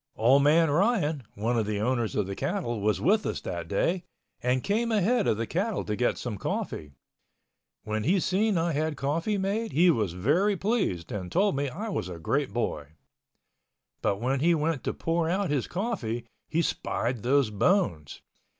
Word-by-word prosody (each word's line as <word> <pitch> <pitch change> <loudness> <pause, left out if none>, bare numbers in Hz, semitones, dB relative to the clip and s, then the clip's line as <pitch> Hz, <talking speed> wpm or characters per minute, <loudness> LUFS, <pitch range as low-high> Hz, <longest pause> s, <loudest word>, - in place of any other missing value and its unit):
Old 130 +5 +5
man 155 +2 +4
Ryan, 170 - +2
one 115 +3 0
of 110 - -1
the 105 -1 -1
owners 120 0 0
of 105 - +1
the 100 +1 -5
cattle, 120 - -2
was 105 +1 +1
with 210 +4 +3
us - - -2
that 85 -1 -5
day, 170 - 0 0.4
and 125 +1 +1
came 230 +3 0
ahead 220 +2 +2
of 105 - +2
the 115 - -1
cattle 195 - -1
to 105 - -2
get 120 +2 +1
some 110 -6 -5
coffee. 75 -2 -4 0.9
When 110 0 -2
he 185 - +3
seen 195 +3 +1
I 165 +1 +1
had 155 +1 -1
coffee 165 +9 -1
made, 205 +4 -1
he 175 +4 +5
was 105 - 0
very 170 - +2
pleased, 190 - -1
and 90 -4 -5
told 200 - +2
me 140 0 -1
I 205 - -5
was 95 - -3
a 90 - -6
great 135 - -1
boy. 75 -11 -3 1.1
But 100 - 0
when 130 +4 0
he 170 +4 +4
went 155 -2 -1
to - - -1
pour 165 0 0
out 190 -1 0
his 140 -5 0
coffee, 175 - -3 0.2
he 165 +1 +1
spied 120 -5 -2
those 130 -1 +2
bones. 100 - 0
145 Hz, 185 wpm, -27 LUFS, -, 1.1 s, Old